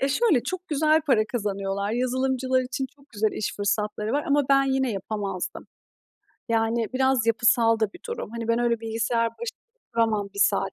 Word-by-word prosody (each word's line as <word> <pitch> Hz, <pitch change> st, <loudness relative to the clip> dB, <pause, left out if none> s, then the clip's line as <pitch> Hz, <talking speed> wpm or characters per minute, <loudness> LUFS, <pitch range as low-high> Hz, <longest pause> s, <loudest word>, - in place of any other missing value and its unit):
E, 275 Hz, -, +2 dB
şöyle, 305 Hz, -, +3 dB
çok 370 Hz, +5 st, -5 dB
güzel 310 Hz, +1 st, +3 dB
para 235 Hz, -7 st, +4 dB
kazanıyorlar. 200 Hz, -2 st, -2 dB
Yazılımcılar 260 Hz, +1 st, +1 dB
için 265 Hz, +2 st, -3 dB
çok 280 Hz, 0 st, -24 dB
güzel 215 Hz, -1 st, 0 dB
iş 210 Hz, -, -3 dB
fırsatları 210 Hz, +2 st, -1 dB
var 290 Hz, +1 st, 0 dB
ama 285 Hz, +1 st, +4 dB
ben 275 Hz, 0 st, +5 dB
yine 265 Hz, -3 st, +1 dB
yapamazdım. 195 Hz, -2 st, -4 dB, 0.8 s
Yani 225 Hz, 0 st, +1 dB
biraz 260 Hz, -3 st, +2 dB
yapısal 230 Hz, 0 st, +3 dB
da 210 Hz, -2 st, +1 dB
bir -, -, -13 dB
durum. 470 Hz, -, -5 dB
Hani, 230 Hz, 0 st, -5 dB
ben 230 Hz, +1 st, +2 dB
öyle 235 Hz, -2 st, +1 dB
bilgisayar 230 Hz, +1 st, 0 dB
baş 470 Hz, -, -7 dB, 0.5 s
duramam 220 Hz, -3 st, +1 dB
1 200 Hz, -, -3 dB
saat -, -, +2 dB
230 Hz, 175 wpm, -25 LUFS, 215-265 Hz, 0.8 s, ben